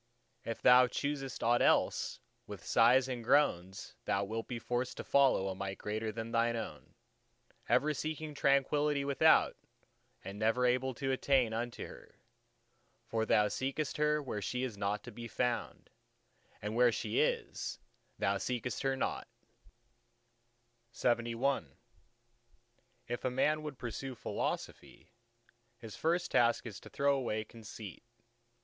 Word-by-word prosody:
If 115 - -5
thou 125 0 +8
choosest 135 0 -3
aught 120 +1 +3
else, - - +2 0.3
with - - -9
sighs 125 +3 +5
and 125 -3 -4
groans 95 -8 +1
thou 100 - +1
wilt 110 +3 -4
be 120 - -4
forced 120 +2 -2
to - - -5
follow 135 -8 +3
a 95 - -2
Might 95 0 -5
greater 110 +1 -3
than 115 +1 -5
thine 115 0 +2
own, 115 - -7 0.7
ever 150 +2 +3
seeking 155 +1 -4
Tranquillity 140 +1 +2
without, 140 -2 +4 0.7
and 100 +1 -7
never 115 +3 +2
able 125 +1 +1
to 135 0 -2
attain 130 -3 +2
unto 120 +1 -3
her. - - -13 0.9
For 110 -1 -1
thou 105 0 +4
seekest 135 +7 -2
her 150 0 +2
where 105 -6 -4
she 125 +7 -2
is 125 -5 -3
not 100 +1 -2
to - - -9
be 120 -1 -7
found; 120 +1 -2 0.7
and 105 +1 -3
where 120 0 +5
she 255 - -1
is, 475 0 -1 0.4
there - - +1
thou - - 0
seekest 125 -1 -3
her 135 0 +1
not! - - -2 1.7
LXXII 120 - 0 1.4
If 120 0 -4
a 130 - +1
man 150 +5 +1
would 150 -3 -6
pursue 125 +2 -5
Philosophy, - - -5 0.7
his 115 -3 -9
first 175 +2 0
task 120 0 +3
is 105 -6 -7
to - - -13
throw 140 0 +2
away 115 -5 -1
conceit. 110 -2 -10
125 Hz, 140 wpm, -33 LUFS, 110-135 Hz, 1.7 s, thou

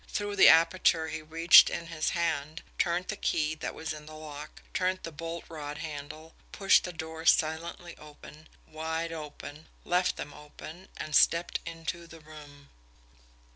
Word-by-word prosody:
Through 205 -1 -3
the - - +8
aperture 165 0 +4
he 160 0 -5
reached 165 +3 +7
in 170 - -4
his 165 -2 -2
hand, 160 -2 -2 0.2
turned 175 +1 0
the 215 - -2
key 155 -5 0
that 155 - -6
was 160 -1 -4
in 150 0 -11
the 155 - -10
lock, 150 -1 -10
turned 185 0 0
the 165 - -6
bolt 165 +2 -6
rod 150 -2 -7
handle, 155 +1 -8 0.2
pushed 195 -2 +4
the 180 - -5
doors 160 0 +1
silently 165 +2 -3
open 150 +1 -14 0.2
wide 160 +1 -4
open 150 -1 -9 0.2
left 180 +1 +1
them 145 - -7
open 155 +4 -12
and 155 - -4
stepped 170 +1 +3
into 165 +1 -6
the 165 0 -13
room. 150 -2 -14
160 Hz, 160 wpm, -29 LUFS, 155-170 Hz, 0.2 s, the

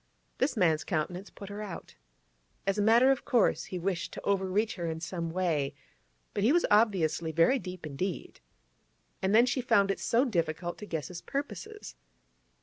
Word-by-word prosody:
This 260 -1 +1
man's 160 -6 +3
countenance 180 +3 -3
put 200 - -10
her 205 +1 -6
out. 200 -5 -7 0.7
As 195 +1 0
a - - +3
matter 235 +5 +6
of 270 - 0
course, 240 -6 +2
he 185 - -5
wished 180 0 -2
to - - -7
overreach 200 +2 +1
her 170 -2 -4
in 160 0 -3
some 170 0 -4
way, 165 -5 -1 0.6
but 200 - -1
he 230 - +5
was 345 +2 +3
obviously 185 -7 +3
very 170 - +4
deep 180 -5 -8
indeed. 160 +5 -4 0.8
And 190 +2 +2
then 235 +2 +7
she 255 +1 0
found 200 -5 +3
it - - -3
so 240 +4 +2
difficult 170 - -2
to 210 - -8
guess 160 -5 -4
his 175 -2 -7
purposes. 230 - -6
190 Hz, 175 wpm, -30 LUFS, 170-215 Hz, 0.8 s, then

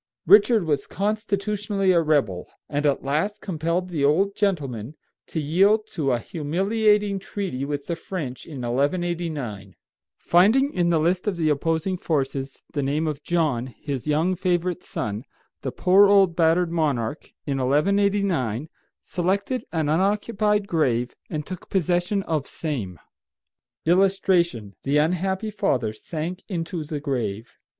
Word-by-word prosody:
Richard 210 0 +6
was 145 -3 0
constitutionally 205 -1 0
a 170 -2 +4
rebel, 140 - 0 0.2
and 145 0 0
at 140 - 0
last 160 +10 -1
compelled 170 0 -2
the 155 -5 -2
old 190 +8 +3
gentleman 145 - -1 0.3
to 160 - -3
yield 195 +8 +3
to 140 -4 0
a 120 - +2
humiliating 200 - +1
treaty 185 -9 -4
with 145 -1 -4
the 170 - -2
French 165 -7 -6
in 145 -6 -7
1189. 140 - -2 0.4
Finding 225 +11 +4
in 175 -1 +1
the 170 - +3
list 180 +5 +1
of 195 -4 0
the 160 -2 +1
opposing 165 +5 0
forces 135 -5 -2
the 145 - 0
name 145 +4 0
of 150 -2 -3
John, 150 -8 0
his 135 +1 -6
young 155 +5 +2
favorite 180 -1 -1
son, 105 +2 -4 0.4
the 130 - -3
poor 195 +7 +5
old 195 -4 +5
battered 165 +1 +3
monarch, 145 -5 -1 0.2
in 140 -2 -1
1189, 160 - +1 0.3
selected 200 +8 -1
an 160 -3 0
unoccupied 205 +4 +1
grave 125 -8 0
and 150 -2 -3
took 185 +1 -8
possession 180 +2 +1
of 155 -6 -2
same. 115 - -4 0.9
[Illustration: 175 - +2
THE 140 +2 +1
UNHAPPY 190 +7 0
FATHER 130 - 0
SANK 165 - -5
INTO 170 -2 -3
THE 150 0 -4
GRAVE. 120 -6 -3
165 Hz, 135 wpm, -24 LUFS, 140-195 Hz, 0.9 s, Richard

